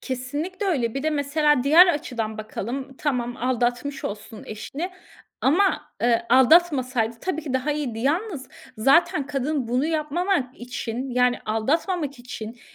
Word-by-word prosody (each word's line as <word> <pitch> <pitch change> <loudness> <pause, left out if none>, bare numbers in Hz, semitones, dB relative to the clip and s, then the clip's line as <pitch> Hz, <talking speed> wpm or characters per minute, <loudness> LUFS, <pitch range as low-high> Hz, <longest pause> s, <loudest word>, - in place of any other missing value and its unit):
Kesinlikle 290 +10 -4
öyle. 250 -10 0
Bir 275 - -3
de 315 - +1
mesela 295 -1 +2
diğer 325 +6 +8
açıdan 235 -9 -2
bakalım. 255 +5 -5
Tamam, 245 -5 -1
aldatmış 250 +3 -1
olsun 215 +2 -6
eşini 275 - -5 0.5
ama, 300 -1 +2
eee, 235 -1 +2
aldatmasaydı 255 -5 +4
tabii 320 -4 -3
ki 290 -4 -5
daha 260 +3 0
iyiydi. 275 -7 -3
Yalnız 300 - -1 0.3
zaten 275 +3 +3
kadın 280 -2 -2
bunu 250 +5 +1
yapmamak 315 -2 -1
için 245 +1 -5
yani 250 0 +2
aldatmamak 285 - -1
için, 240 -1 -8
270 Hz, 130 wpm, -24 LUFS, 245-305 Hz, 0.5 s, diğer